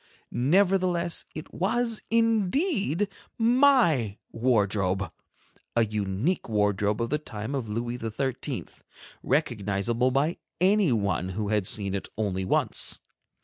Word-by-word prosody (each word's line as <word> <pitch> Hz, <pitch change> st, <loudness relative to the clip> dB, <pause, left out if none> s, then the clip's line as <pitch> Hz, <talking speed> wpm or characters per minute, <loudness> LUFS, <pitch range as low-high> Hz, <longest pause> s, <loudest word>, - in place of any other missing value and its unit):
Nevertheless 180 Hz, +3 st, +2 dB
it 155 Hz, -, -8 dB
was 230 Hz, +4 st, 0 dB
indeed 225 Hz, -, +1 dB, 0.3 s
my 230 Hz, -, +4 dB
wardrobe; 100 Hz, -5 st, +1 dB, 0.6 s
a 115 Hz, -1 st, +4 dB
unique 105 Hz, -, -1 dB
wardrobe 105 Hz, 0 st, +1 dB
of 115 Hz, -, -4 dB
the 150 Hz, -, +1 dB
time 110 Hz, -3 st, -6 dB
of 130 Hz, -6 st, -3 dB
Louis 120 Hz, +3 st, -3 dB
XIII., 120 Hz, +3 st, -3 dB, 0.6 s
recognizable 115 Hz, +3 st, 0 dB
by 140 Hz, +6 st, +1 dB, 0.2 s
anyone 135 Hz, -, +2 dB
who 100 Hz, +2 st, -3 dB
had 105 Hz, -3 st, +1 dB
seen 100 Hz, -3 st, -1 dB
it 100 Hz, -, -4 dB
only 95 Hz, -3 st, -1 dB
once. -, -, +2 dB
120 Hz, 105 wpm, -27 LUFS, -, 0.6 s, my